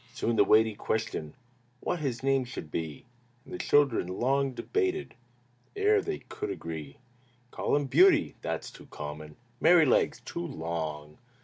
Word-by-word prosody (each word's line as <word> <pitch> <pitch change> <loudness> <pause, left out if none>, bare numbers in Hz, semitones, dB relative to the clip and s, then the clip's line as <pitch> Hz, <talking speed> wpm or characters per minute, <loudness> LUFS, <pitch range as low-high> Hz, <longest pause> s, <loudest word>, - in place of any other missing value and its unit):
Soon 120 - 0
arose 115 - -1
the - - +7
weighty 110 +2 +5
question 105 -8 -3 0.4
What 175 - -2
his 130 -5 -3
name 135 -1 +2
should 120 - -8
be, 80 -4 -4 0.4
And - - -11
the - - -5
children 140 -10 +3
long 135 +8 0
debated 380 - -1 0.6
Ere 415 +1 +3
they 395 0 -3
could 415 -2 -6
agree. 80 - -6 0.5
"Call - - 0
him 145 0 +1
'Beauty.'" 345 - +5
"That's 80 -1 -4
too - - -14
common!" 75 0 -8 0.3
"Merrylegs." - - +4
"Too - - -4
long!" 80 -2 -5
115 Hz, 145 wpm, -29 LUFS, -, 0.6 s, the